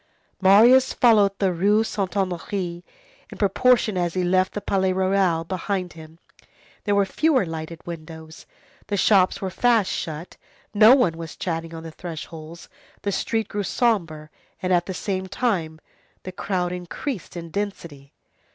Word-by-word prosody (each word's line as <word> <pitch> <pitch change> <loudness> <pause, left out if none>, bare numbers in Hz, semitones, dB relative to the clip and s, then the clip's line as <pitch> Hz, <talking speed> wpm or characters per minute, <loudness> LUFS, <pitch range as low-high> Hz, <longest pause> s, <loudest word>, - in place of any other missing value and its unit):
Marius 225 +7 +6
followed 205 -5 +4
the 190 -2 +1
Rue 205 +5 +3
Saint 200 -4 -2
Honoré. 180 -2 -3 0.5
In - - -10
proportion 215 0 +2
as 175 -1 -1
he 185 - 0
left 185 +1 +1
the - - -3
Palais 190 -2 0
Royal 185 -3 +1
behind 185 +1 -3
him, 160 0 -13 0.7
there 205 - +2
were 200 -1 +3
fewer 280 +1 +1
lighted 165 0 -7
windows, 160 -1 -10 0.4
the 205 - -1
shops 190 -2 +3
were 190 -1 -3
fast 230 -2 +2
shut, 160 +2 -5 0.4
no 220 +4 +8
one 210 -12 +1
was 165 -2 -8
chatting 165 -1 -4
on 165 - -8
the 165 - -8
thresholds, 165 0 -9 0.4
the 200 - -1
street 225 +2 -1
grew 205 - -3
sombre, 170 -9 -1 0.3
and, 185 0 0
at 175 0 +2
the 190 - -4
same 190 -1 -3
time, 180 -9 -2 0.4
the 185 - -6
crowd 180 -1 -2
increased 180 - -6
in 170 -1 -8
density. 165 -8 -5
185 Hz, 150 wpm, -23 LUFS, 165-205 Hz, 0.7 s, no